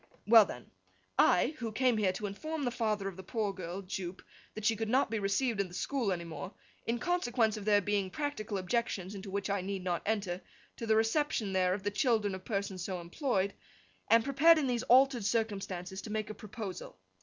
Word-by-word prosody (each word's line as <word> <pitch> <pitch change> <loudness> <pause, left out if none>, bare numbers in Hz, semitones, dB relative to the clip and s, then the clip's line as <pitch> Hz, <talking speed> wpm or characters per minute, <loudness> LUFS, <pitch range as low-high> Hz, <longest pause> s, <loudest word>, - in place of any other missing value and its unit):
'Well 225 -1 +8
then. 125 -9 -9 0.5
I, 235 - +5
who 230 -2 -3
came 250 +1 +2
here 200 -3 +2
to 210 - -4
inform 310 +10 -4
the 245 - 0
father 215 -4 -1
of 190 -2 -6
the - - -6
poor 205 +1 -2
girl, 185 +1 -6
Jupe, 185 -1 -5 0.3
that 215 -1 -5
she 225 - +4
could 220 0 -3
not 255 -1 +2
be 225 - 0
received 205 +2 +1
at 195 - -2
the 175 - -11
school 255 -5 -1
any 175 -2 -2
more, 170 +3 -7 0.3
in 230 +1 +1
consequence 240 -8 +1
of 210 -2 -7
there 205 -1 +4
being 200 -1 0
practical 215 -5 -3
objections, 190 -1 -1
into 195 0 -7
which 200 +1 -2
I 200 -1 0
need 190 0 -4
not 175 -2 -1
enter, 200 -4 -1 0.4
to 230 - -5
the 220 - +4
reception 225 -2 +1
there 185 -1 +2
of 195 - -7
the 205 - -1
children 215 -3 +1
of 190 0 -6
persons 195 -4 -3
so 185 -1 -3
employed, 195 - -1 0.6
am 230 +1 +6
prepared 295 +5 +6
in 305 - +1
these 245 -3 0
altered 255 -2 +5
circumstances 195 -4 -2
to - - -8
make 215 0 -2
a - - -5
proposal. 205 - -7
210 Hz, 210 wpm, -32 LUFS, 190-235 Hz, 0.6 s, Well